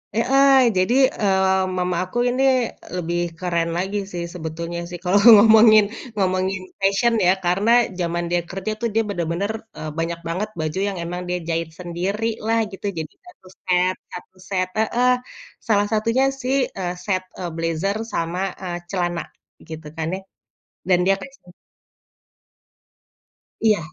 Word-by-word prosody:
Heeh. 270 +4 +4 0.2
Jadi, 185 +7 +2 0.3
eee, 190 -1 +3
mama 180 0 0
aku 185 +6 -6
ini 255 +2 0 0.5
lebih 175 -1 -2 0.2
keren 170 -2 0
lagi 190 +3 -2
sih, 175 -1 -4
sebetulnya 170 0 -5
sih. 175 -1 -7
Kalau 190 +2 +3 0.2
ngomongin 215 0 +7 0.3
ngomongin 190 -1 0 0.2
fashion, 200 +5 +2
ya. - - +6
Karena 195 +6 +2 0.3
zaman 175 0 -1
dia 175 0 +2
kerja 195 +3 -4
tuh, 235 - 0
dia 225 0 +2
benar-benar, 175 +2 -2 0.3
eee, 155 0 -5
banyak 170 +1 -2
banget 185 +6 -2
baju 155 +3 -2
yang 195 -2 -3
emang 175 +1 -4
dia 180 - 0
jahit 165 -1 -1
sendiri 180 +5 -3 0.2
lah, 225 +1 +2
gitu. 195 +1 -9
Jadi, 155 -1 -6
satu 360 - -17 0.2
set 180 0 +2 0.2
satu 180 +1 -10 0.2
set 185 -1 +1
heeh. 240 +3 +2 0.6
Salah 205 -2 +3
satunya 230 +4 +2 0.2
sih, 260 +1 0 0.2
eee, 180 -1 -2
set, 185 -2 0 0.2
eee, 180 -2 -3
blazer 165 +4 -1 0.2
sama 170 +2 -2 0.2
eee, 175 -1 -3
celana, 175 -3 -1 0.5
gitu 160 -1 -8
kan, 160 - -2
ya. - - -6 0.7
Dan 180 -2 +5
dia 195 - +5
kayak, 275 - -9
se 180 - -17 2.1
Iya. 215 -3 +4
185 Hz, 150 wpm, -22 LUFS, 175-210 Hz, 2.1 s, ngomongin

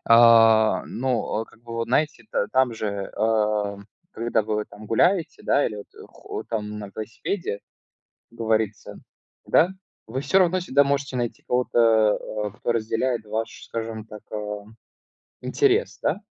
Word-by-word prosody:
А, 115 -1 +6
ну, 130 -1 -1
о, 110 +1 -2
как 110 - -22
бы, 115 -1 -10
вот, 115 0 -2
знаете, 155 +1 0
это, - - -1
там 130 -2 +2
же, 100 -3 -4
а, 105 -2 +1 0.4
когда 115 -1 0
вы, 105 - -2
вот, 105 - -3
там, 105 +1 -12
гуляете, 165 - +2
да, 145 - +3
или, 105 - -4
вот, 100 - -9 0.2
хо - - -7
там, 105 -2 -4
на 100 -2 -7
велосипеде, 110 - -4 0.7
как 115 - -20
говорится. 110 -2 -1 0.5
Да? 175 +3 +4 0.4
Вы 130 +4 -3
всё 190 +6 +3
равно 185 0 +3
всегда 140 -4 +3
можете 140 -2 -1
найти 120 -2 -3
кого-то, 115 -3 +3 0.3
а, - - -3
кто 120 - -2
разделяет 115 +1 -1
ваш, 110 +1 -4
скажем 110 -1 -5
так, 105 -1 -11
а, 105 -1 -4 0.8
интерес, 420 +2 +1
да? - - +1
115 Hz, 155 wpm, -24 LUFS, 105-130 Hz, 0.8 s, А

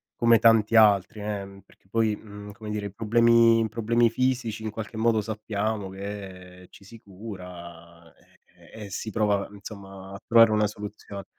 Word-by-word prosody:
come 115 -2 +4
tanti 115 -1 +4
altri 105 -1 +4
eh, 100 -2 -6
perché 95 - -27
poi, 110 0 +1
uhm, 105 -1 -11
come 105 +1 -8
dire 105 -1 -3
i - - -9
problemi 115 +2 +4
i 110 - 0
problemi 115 +2 +2
fisici 120 -3 -1
in 110 - -4
qualche 110 0 -7
modo 110 -1 +2
sappiamo 105 -1 -3
che 95 -2 -9
ci - - -17
si 115 +3 -14
cura 85 -5 -11
e - - -28 0.5
e - - -10
si 110 +3 -5
prova 105 -2 0
insomma 100 -2 -11
a 100 - -8
trovare 115 -1 +6
una 105 0 +2
soluzione. 105 -1 -8
105 Hz, 165 wpm, -25 LUFS, 100-110 Hz, 0.5 s, trovare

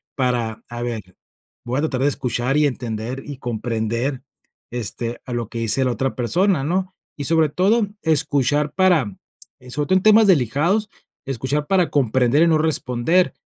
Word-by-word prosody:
para, 120 -4 -1
a 120 0 -6
ver, 120 -2 -3 0.6
voy 125 +3 -1
a - - 0
tratar 140 -5 -1
de - - +4
escuchar 125 -1 -1
y 150 - +4
entender 120 0 -4
y 145 -2 -7
comprender, 120 +2 -2 0.5
este, 120 0 -4
a 125 - -6
lo 120 -2 -3
que 115 - -5
dice 115 +4 +2
la 125 - +1
otra 130 +2 -2
persona, 170 - +1
¿no? 185 +5 -2 0.2
Y 145 - -4
sobre 160 0 +3
todo 205 +8 +2 0.2
escuchar 145 -2 +1
para, 170 - +2 0.4
eh, 125 - -13
sobre 145 +3 -2
todo 185 - +4
en 190 - -2
temas 215 0 +6
delicados, 170 - +2 0.4
escuchar 135 +3 -2
para 185 -2 +2
comprender 130 +2 +3
y - - +4
no 160 -1 +4
responder, 155 +2 +1
135 Hz, 170 wpm, -21 LUFS, 120-160 Hz, 0.6 s, temas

